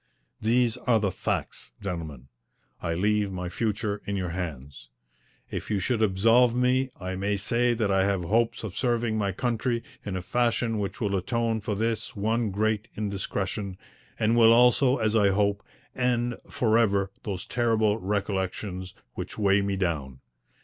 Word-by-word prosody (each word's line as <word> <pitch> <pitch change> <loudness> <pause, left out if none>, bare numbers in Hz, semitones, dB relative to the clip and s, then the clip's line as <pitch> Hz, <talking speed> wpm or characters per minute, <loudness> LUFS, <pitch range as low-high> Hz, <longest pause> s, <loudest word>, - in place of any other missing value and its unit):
These 115 +1 +2
are 115 -2 +2
the 100 -3 0
facts, - - -3
gentlemen. 80 -9 -6 0.5
I 85 0 -1
leave 105 +2 +1
my 90 -1 -4
future 105 +1 -2
in 100 - -1
your 90 -3 -2
hands. 70 -8 -6 0.6
If - - -5
you 105 - +1
should 120 +2 0
absolve 115 +4 +4
me 125 +1 +2
I 95 0 -4
may 100 +2 0
say 120 +4 +1
that 110 -3 0
I 95 0 +3
have 100 -3 0
hopes 115 +7 +1
of 100 -4 -5
serving 120 -3 0
my 100 -2 0
country 120 +3 -1 0.2
in 100 -2 -4
a 90 - -5
fashion 115 +2 0
which 100 +1 -4
will 100 -3 0
atone 115 +4 0
for 105 0 -2
this 115 +2 -2
one 110 +2 0
great 110 +2 0
indiscretion, 100 -1 -3 0.4
and 110 +1 +2
will 115 -1 +7
also, 125 +2 +5
as 110 0 +1
I 105 -3 +5
hope, 100 +1 +1 0.3
end 120 -1 +1 0.2
for 115 -1 +2
ever 100 -4 +2
those 95 -3 -4
terrible 115 -3 +1
recollections 95 -2 -3 0.2
which - - -6
weigh 100 -1 +3
me 100 0 -1
down. 75 -9 -2
105 Hz, 160 wpm, -27 LUFS, 95-115 Hz, 0.6 s, will